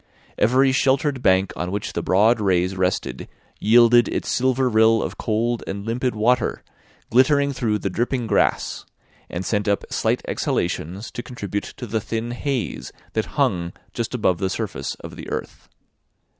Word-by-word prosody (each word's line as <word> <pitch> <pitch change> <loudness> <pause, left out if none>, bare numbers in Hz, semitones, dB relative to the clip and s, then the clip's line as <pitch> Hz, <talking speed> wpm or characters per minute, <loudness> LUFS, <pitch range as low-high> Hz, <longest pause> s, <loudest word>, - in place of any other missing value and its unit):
Every 130 +4 +4
sheltered 135 +1 +1
bank 95 -1 +3
on 90 - -3
which 100 +2 -3
the - - -2
broad 110 +5 +3
rays 95 -1 +1
rested 90 -1 -1 0.3
yielded 120 +1 +6
its - - -3
silver 130 +1 +2
rill 110 -1 +4
of - - -5
cold 115 +2 0
and 100 +1 -5
limpid 120 +1 -1
water, 120 +3 +1 0.5
glittering 140 +3 +4
through 110 -4 0
the 100 - -3
dripping 120 +4 -1
grass; 105 -3 +1 0.5
and 90 +2 -4
sent 105 -1 0
up 100 -1 +1
slight - - 0
exhalations 90 +4 -2
to - - -5
contribute 100 -5 -5
to 125 - -5
the 110 0 -2
thin 115 +3 -3
haze 120 - -3 0.2
that - - 0
hung 85 -1 +1 0.2
just 115 +1 -3
above 95 -7 +1
the 95 - 0
surface - - -4
of - - -10
the - - -8
earth. - - -6
110 Hz, 155 wpm, -22 LUFS, 100-125 Hz, 0.5 s, yielded